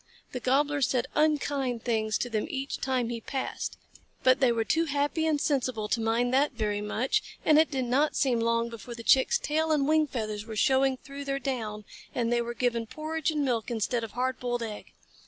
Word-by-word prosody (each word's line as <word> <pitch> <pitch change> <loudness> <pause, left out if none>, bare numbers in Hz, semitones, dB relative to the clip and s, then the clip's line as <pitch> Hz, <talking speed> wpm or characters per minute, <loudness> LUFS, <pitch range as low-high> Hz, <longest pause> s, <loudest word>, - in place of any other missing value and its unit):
The 250 - -4
Gobbler 285 +4 +1
said 250 -2 +2
unkind 285 -5 +1
things 220 -3 0
to - - -2
them 215 -1 -1
each 270 0 -3
time 255 -3 0
he 235 -1 -4
passed, 265 +2 -4 0.5
but 255 0 +5
they 255 -3 +4
were 230 -1 +1
too 320 +9 +1
happy 290 +2 0
and 305 -2 +2
sensible 255 -7 0
to 230 - +1
mind 235 +3 +1
that 280 +2 +3
very 210 -3 -1
much, 245 - 0 0.2
and 305 -1 +6
it 320 - +4
did 265 -3 -1
not 275 +5 +2
seem 255 -5 +2
long 230 0 +1
before 235 +1 -8
the 230 - -9
Chicks' 270 - +4
tail 315 -4 0
and 285 -3 +2
wing 310 0 +3
feathers 215 -5 -4
were 220 - -6
showing 265 +3 +3
through 280 +2 -9
their 275 0 -1
down, 225 -6 -4 0.3
and 235 -1 +1
they 240 - +2
were 235 0 -4
given 235 -2 0
porridge 315 +3 -2
and 300 -2 0
milk 235 -3 -1
instead 235 +1 -1
of 225 - -6
hard 255 +1 -1
boiled 245 -1 -2
egg. 215 -2 -7
255 Hz, 210 wpm, -28 LUFS, 230-285 Hz, 0.5 s, and